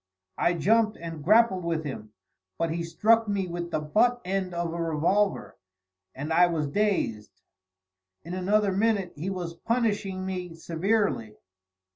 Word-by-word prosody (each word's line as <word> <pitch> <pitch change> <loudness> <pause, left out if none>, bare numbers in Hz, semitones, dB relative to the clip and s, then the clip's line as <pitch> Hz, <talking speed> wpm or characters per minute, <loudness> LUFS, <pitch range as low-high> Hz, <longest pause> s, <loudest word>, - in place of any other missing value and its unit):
I 175 - +2
jumped 215 +5 +2
and 165 -3 -7
grappled 210 0 +4
with 165 -1 -1
him, 120 -7 -7 0.5
but 165 -1 -1
he 170 +1 -2
struck 220 +7 +2
me 200 -2 0
with 175 -1 -5
the 160 - -1
butt 220 +11 +2
end 190 0 -1
of 170 -1 -3
a 170 - -3
revolver, 165 - 0 0.6
and 150 +4 -3
I 175 +2 +6
was 160 -4 -1
dazed; 165 - -1 0.8
in 170 - -7
another 200 +2 +2
minute, 200 -2 +1
he 165 +6 -4
was 180 -3 -4
punishing 205 -2 -1
me 180 -3 -5
severely. 165 - -1
180 Hz, 145 wpm, -27 LUFS, 165-205 Hz, 0.8 s, I